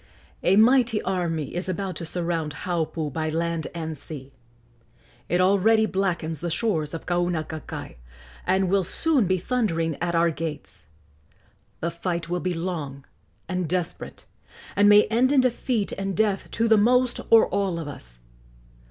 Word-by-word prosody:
A 185 - +3
mighty 235 0 +5
army 170 -6 -2
is 180 +2 -3
about 185 0 -3
to 165 - -4
surround 165 -3 -2
Haupu 160 -4 -2
by 155 +1 -1
land 165 0 -1
and 160 -1 -4
sea. 140 -2 -9 1.0
It 175 - +2
already 200 +4 +4
blackens 175 -6 -1
the 175 - -3
shores 165 -4 -1
of 165 - -7
Kaunakakai, 175 - -3 0.5
and 190 +1 +2
will 195 +1 +2
soon 265 - +1
be 185 +1 +2
thundering 170 - -1
at 175 -1 -1
our 170 0 +3
gates. 140 - -6 0.9
The 170 - -1
fight 170 -1 -3
will 180 0 -1
be 180 -1 -2
long 155 -6 -4 0.4
and 180 -3 -2
desperate, 180 -1 -4 0.5
and 205 +1 +5
may 210 0 +8
end 240 +5 +2
in 280 -2 +5
defeat 245 -3 0
and 195 -1 -3
death 210 -3 +1
to 230 0 0
the 220 -1 +5
most 250 +3 +3
or 225 -1 +7
all 195 -3 0
of 165 -3 -5
us. - - -10
175 Hz, 150 wpm, -25 LUFS, 160-205 Hz, 1.0 s, may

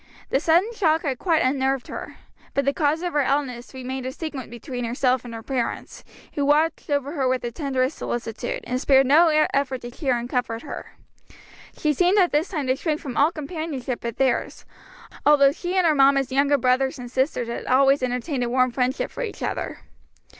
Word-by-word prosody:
The 270 - +3
sudden 345 +9 +2
shock 325 -7 +2
had 270 -5 -2
quite 335 -3 +2
unnerved 265 0 0
her; - - -7 0.4
but 280 - +1
the 280 - +2
cause 310 +3 0
of 355 - -2
her 295 - +3
illness 265 -3 -1
remained 260 0 -5
a - - -3
secret 295 -3 -6
between 245 +1 -6
herself 250 +1 +1
and 240 - -9
her 225 - -8
parents, 250 -2 -3 0.3
who 285 - -1
watched 305 +3 +1
over 285 -1 0
her 275 -5 0
with 255 0 0
the 240 - -3
tenderest 265 +1 -1
solicitude, 230 -2 -4
and 250 +1 -3
spared 270 -1 +5
no 310 +6 +6 0.3
effort 270 -2 0
to 240 - -7
cheer 260 -2 0
and 240 0 -4
comfort 245 -2 -2
her. - - -8 0.8
She 305 -1 +1
seemed 360 +7 +3
at 365 -3 +4
this 300 +5 +1
time 305 -7 -3
to 260 0 +2
shrink 305 +2 -2
from 265 -6 -7
all 295 +4 +4
companionship 300 -5 -4
but 235 -1 -5
theirs, 265 -2 0 0.6
although 280 -2 +6
she 355 +4 -4
and 370 -2 +3
her 320 - +4
mamma's 275 -2 +4
younger 280 +2 +3
brothers 260 +1 +1
and 245 -1 -8
sisters 260 -2 0
had 235 - -5
always 270 +2 +4
entertained 250 +2 -2
a 240 - -1
warm 255 0 +2
friendship 250 +2 -1
for - - -6
each 465 -4 -5
other. - - -4
270 Hz, 200 wpm, -23 LUFS, 255-300 Hz, 0.8 s, no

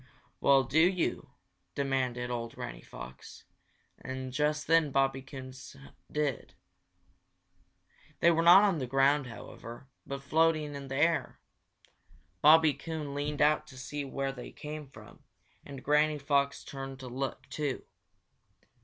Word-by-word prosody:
"Well, 135 -1 +5
do 135 +6 +1
you?" 175 -4 +1 0.5
demanded 130 -3 -1
old 115 -1 -4
Granny - - -7
Fox. 65 +1 -11 0.6
And 130 0 -6
just 150 +2 0
then 165 -1 +4
Bobby 135 0 +1
Coon 130 -1 -9 0.6
did. 150 -4 -2 1.6
They 170 - +5
were 165 0 +2
not 175 +4 +8
on 195 -6 +2
the 130 - -3
ground, 135 +2 +3
however, 120 +1 -10 0.2
but 140 0 -5
floating 155 0 +2
in 140 -1 -7
the 135 - -5
air. 165 +4 +1 1.0
Bobby 155 0 +7
Coon 155 -3 -5
leaned 145 +1 -1
out 150 +1 +3
to 130 - -13
see 145 +2 -5
where 135 0 -3
they 125 -2 -9
came 150 -1 -7
from, - - -15 0.4
and 140 -2 -10
Granny 150 +1 +3
Fox 140 -1 0
turned 135 -1 -7
to 130 - -7
look, 135 +1 -4
too. 145 -2 -3
140 Hz, 135 wpm, -30 LUFS, 130-150 Hz, 1.6 s, not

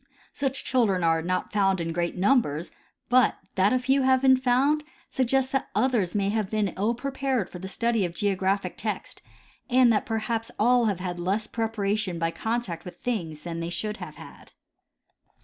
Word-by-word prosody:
Such 270 -1 -2
children 210 -9 +2
are 165 -1 +3
not 185 +2 -2
found 195 -2 +2
in 165 0 -2
great 175 +1 -2
numbers, 185 - +1 0.4
but 250 -1 +4 0.2
that 190 +2 +3
a 255 - +3
few 265 +2 +2
have 260 0 +3
been 260 -1 +7
found 260 +4 +2 0.3
suggests 265 +1 +1
that 270 -1 -1
others 215 -5 +1
may 200 -1 +1
have 210 -2 -1
been 215 -2 0
ill 215 +5 0
prepared 265 -4 -2
for 180 - -8
the 190 - -6
study 230 +2 0
of 175 - -1
geographic 195 0 0
text, - - -5 0.5
and 250 -2 +5
that 210 - 0
perhaps 225 0 -2
all 240 +2 +4
have 200 -5 -1
had 175 -1 -4
less 195 +5 0
preparation 210 -5 -2
by 165 0 0
contact 220 -6 -3
with 180 - -10
things 170 -11 -3
than 170 -1 -5
they 165 0 -3
should 210 +5 -3
have 175 -5 -8
had. - - -13
215 Hz, 180 wpm, -26 LUFS, 185-250 Hz, 0.5 s, been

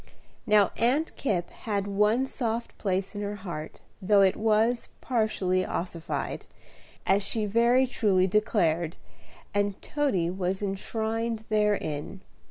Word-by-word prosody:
Now 210 -2 +5
Aunt 270 +8 +1
Kipp 185 -10 -1
had 200 -3 -3
one 210 +5 +2
soft 235 -3 -3
place 190 0 -1
in 205 - -5
her 205 0 -3
heart, 175 -6 -7 0.2
though 200 +1 +4
it 190 -1 +4
was 225 +2 +2
partially 215 -6 0
ossified, 170 -2 -4 0.6
as 195 +1 +3
she 215 +2 0
very 235 +5 +4
truly 205 -7 +2
declared, 175 -5 +1 0.6
and 205 -1 0
Toady 200 - 0
was 190 +1 -2
enshrined 220 +3 -2
therein. 195 -6 0
205 Hz, 120 wpm, -27 LUFS, 190-225 Hz, 0.6 s, Now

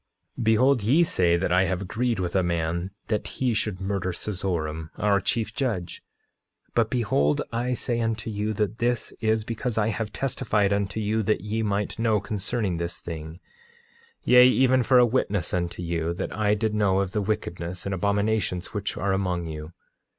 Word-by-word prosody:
9:23 - - -4
Behold 125 +3 +4
ye 135 +12 +4
say 90 - +2
that 90 0 -1
I 90 +1 +4
have 95 +1 -1
agreed 115 +4 -1
with 90 -1 -2
a 95 - +4
man 85 +1 -1 0.2
that 105 -2 -1
he 125 -3 +1
should 105 -3 -1
murder 95 -1 -2
Seezoram, 85 -5 -2
our 100 -1 +3
chief 110 +2 0
judge. 115 -9 -2 0.7
But 115 -2 +2
behold, 85 - +1
I 120 +2 -1
say 120 -1 -1
unto 115 -1 -2
you, 105 +1 -1
that 105 +1 -2
this 120 0 0
is 110 -1 +1
because 115 +1 -3
I 110 0 +2
have 110 -1 -3
testified 105 -5 0
unto 100 +1 -1
you 110 +1 0
that 105 -3 0
ye 105 +3 -2
might 105 0 -1
know 110 -2 +2
concerning 105 -2 -2
this 85 +1 -4
thing; 80 +1 -7 0.8
yea, 125 0 +7
even 130 0 +4
for 125 +2 +4
a 125 - +7
witness 105 -7 0
unto 85 0 -2
you, 85 0 -1
that - - -4
I 105 -1 +2
did 110 0 -1
know 100 -2 +2
of 95 -2 -2
the 105 - -1
wickedness 90 -4 -3
and 100 - -2
abominations 100 0 0
which 105 -1 -3
are 100 -1 0
among 90 -3 -1
you. 75 0 -7
105 Hz, 180 wpm, -25 LUFS, 90-110 Hz, 0.8 s, yea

